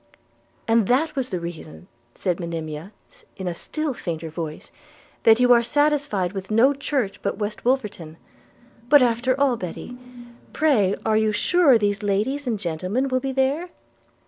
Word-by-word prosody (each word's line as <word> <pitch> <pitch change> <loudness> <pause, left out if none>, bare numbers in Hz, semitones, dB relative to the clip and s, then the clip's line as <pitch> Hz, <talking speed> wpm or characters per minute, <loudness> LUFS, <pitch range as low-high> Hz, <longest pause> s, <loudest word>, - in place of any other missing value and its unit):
'And 225 -3 +3
that 290 +6 +1
was 260 -2 -2
the 185 - -3
reason,' 155 - -9 0.3
said 180 -2 -2
Monimia 165 0 -5 0.5
in 190 - -5
a 175 - -1
still 310 - -4
fainter 165 -7 -5
voice, 160 -1 -6 0.5
'that 225 +1 +5
you 250 0 +6
are 235 - +5
satisfied 285 -8 0
with 190 -1 -6
no 230 +6 +4
church 270 -7 -2
but - - -2
West 210 0 -4
Wolverton? 210 -11 -2 0.7
But 290 -2 +7
after 245 +2 +1
all, 270 -4 +2
Betty, 185 +6 -7 0.6
pray 225 -11 +2
are 220 -1 +3
you 220 0 +2
sure 280 +5 +4
these 205 -1 0
ladies 215 +8 -1
and 230 -3 0
gentlemen 185 +9 -2
will 255 0 +1
be 270 +1 -3
there?' 275 +7 0
220 Hz, 155 wpm, -23 LUFS, 185-265 Hz, 0.7 s, But